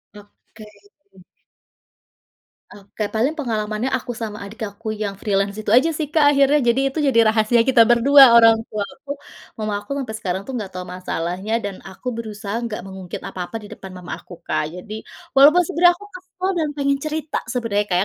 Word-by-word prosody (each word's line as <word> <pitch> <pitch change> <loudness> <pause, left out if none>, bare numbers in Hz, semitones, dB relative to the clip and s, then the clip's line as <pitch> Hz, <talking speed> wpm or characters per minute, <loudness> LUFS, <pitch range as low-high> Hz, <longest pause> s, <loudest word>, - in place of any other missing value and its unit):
Oke. 210 +1 -16 2.1
Oke 205 +1 -6
paling 245 +8 0
pengalamannya 220 -4 -2
aku 245 0 -6
sama 220 -3 -6
adik 215 +3 -12
aku 215 +2 -6
yang 205 -2 -4
freelance 200 0 -1
itu 215 0 -1
aja 260 +7 +5
sih 310 -1 -2
Kak 295 -3 +5
akhirnya 280 0 +4
jadi 235 - +2
itu 315 - -1
jadi 270 -5 +3
rahasia 230 +1 +3
kita 260 -3 +5
berdua 250 +4 +7
orang 225 -1 +6
tuaku 220 +7 -6 0.5
mama 215 -1 -3
aku 205 - -21
ampe 245 -5 -4
sekarang 195 -3 -3
tuh 265 - -7
enggak 215 -6 -4
tahu 180 - -5
masalahnya 180 +3 -3
dan 200 -4 -6
aku 215 +6 -6
berusaha 220 0 -5
nggak 230 -5 -4
mengungkit 190 -2 -8
apa-apa 185 +5 -5
di 210 -2 -11
depan 190 - -10
mama 180 - -9
aku 175 - -12
Kak, 155 - -1
jadi 180 +5 -8 0.4
walaupun 295 +6 +7
sebenarnya 350 -1 +4
aku 410 - -13
kesal 370 0 -6
dan 315 -2 0
pengen 280 -1 +1
cerita 310 0 -3
sebenarnya, 230 -4 -1
Kak, 180 - +2
225 Hz, 175 wpm, -21 LUFS, 200-275 Hz, 2.1 s, berdua